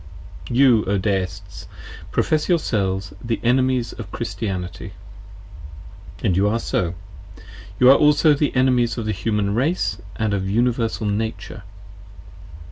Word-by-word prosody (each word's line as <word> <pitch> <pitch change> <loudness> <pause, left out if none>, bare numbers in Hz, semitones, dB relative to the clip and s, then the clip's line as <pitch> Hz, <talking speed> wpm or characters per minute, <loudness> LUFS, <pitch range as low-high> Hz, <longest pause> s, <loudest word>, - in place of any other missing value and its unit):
You, 120 -3 +4
O 100 +1 0
Deists, 95 -1 -3 0.4
profess 155 +2 0
yourselves 100 - 0
the 115 -1 -2
Enemies 130 0 +1
of 105 -4 -9
Christianity: 95 -4 -5 1.3
and 95 -7 +2
you 100 +3 +2
are 110 +3 +1
so: 90 -6 -2 0.8
you 125 - +6
are 140 - +6
also 150 +1 +4
the 145 0 -1
Enemies 125 -2 +2
of 115 - -3
the 110 - -1
Human 100 +1 -1
Race 115 - 0
& - - -17
of 100 -3 -1
Uni 120 +5 +2
versal 115 -2 -3
Nature. 110 +1 -4
110 Hz, 125 wpm, -21 LUFS, 100-125 Hz, 1.3 s, you